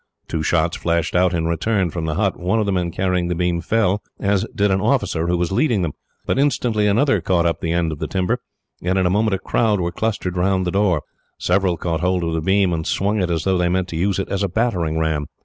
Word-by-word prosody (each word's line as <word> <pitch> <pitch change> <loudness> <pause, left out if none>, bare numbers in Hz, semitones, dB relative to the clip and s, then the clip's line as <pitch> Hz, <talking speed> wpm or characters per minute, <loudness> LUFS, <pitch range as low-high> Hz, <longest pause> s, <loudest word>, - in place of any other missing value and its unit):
Two 80 - -2
shots 85 +2 +1
flashed 85 0 -1
out 90 0 +4
in 85 -2 -1
return, 90 +2 0
from 85 -1 -3
the 80 -1 -2
hut. 100 0 +1
One 90 +5 +1
of 110 - +1
the 100 - 0
men 90 -2 0
carrying 90 0 0
the 90 - -1
beam 85 0 0
fell, 105 0 +1 0.2
as 100 -1 +1
did 100 0 +2
an 95 0 +1
officer 80 -2 +1
who 90 0 +1
was 85 +1 -1
leading 110 - +2
them; 80 - -1 0.3
but - - 0
instantly 120 -6 +1
another 110 0 +2
caught 85 0 +1
up 85 -3 0
the 85 - -1
end 85 -1 +1
of 75 - -6
the - - -3
timber, 95 +6 0 0.4
and 90 +2 0
in 95 - +2
a 90 - +2
moment 105 +1 +2
a - - -2
crowd 105 +1 +1
were 85 -1 -1
clustered 100 -5 -2
round 95 +1 +1
the 90 - -1
door. 95 -6 +1 0.3
Several 90 -1 +1
caught 80 0 -2
hold 90 0 0
of 85 -1 -1
the 80 - -1
beam, 95 +1 +2
and 80 -1 -3
swung 100 +1 0
it 90 - 0
as 80 -2 -1
though 95 0 +1
they 90 0 +2
meant 90 0 0
to - - -5
use 95 +4 0
it 95 - -2
as 100 - -1
a 100 - 0
battering 90 -7 0
ram. 80 -2 -1
90 Hz, 255 wpm, -20 LUFS, 85-100 Hz, 0.4 s, out